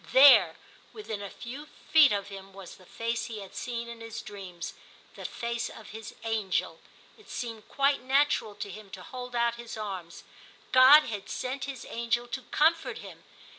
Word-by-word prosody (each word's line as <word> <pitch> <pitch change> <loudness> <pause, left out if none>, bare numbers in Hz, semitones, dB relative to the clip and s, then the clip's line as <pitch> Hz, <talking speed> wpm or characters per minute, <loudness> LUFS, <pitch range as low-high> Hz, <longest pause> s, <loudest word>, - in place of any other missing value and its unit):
There 250 - +8 0.4
within 220 - -6
a 200 - -5
few 265 +9 -8 0.2
feet 310 -3 +8
of 200 -1 -1
him 195 -1 -10
was 195 -2 -10
the 185 - -18
face 230 +1 -2
he 225 -2 -6
had 195 - -11
seen 235 -1 -4
in 235 -1 -9
his 225 -1 -7
dreams, 190 -5 -7 0.4
the - - -9
face 235 0 -3
of 220 - -12
his 220 +1 -9
* - - -19
angel/ 220 -4 -1 0.4
It 430 - -18
seemed 225 -3 -5
quite 275 -1 +2
natural 265 -5 +2
to 205 -1 -6
him 210 +1 -10
to 185 - -11
hold 250 +2 -7
out 235 0 +1
his 235 -1 -8
arms; 190 -6 -6 0.5
God 260 +4 +9
had 205 -6 -6
sent 260 +2 -3
his 270 -4 -7
angel 235 +1 -1
to 260 - -3
comfort 325 +2 +2
him. - - -11
230 Hz, 180 wpm, -29 LUFS, 205-255 Hz, 0.5 s, God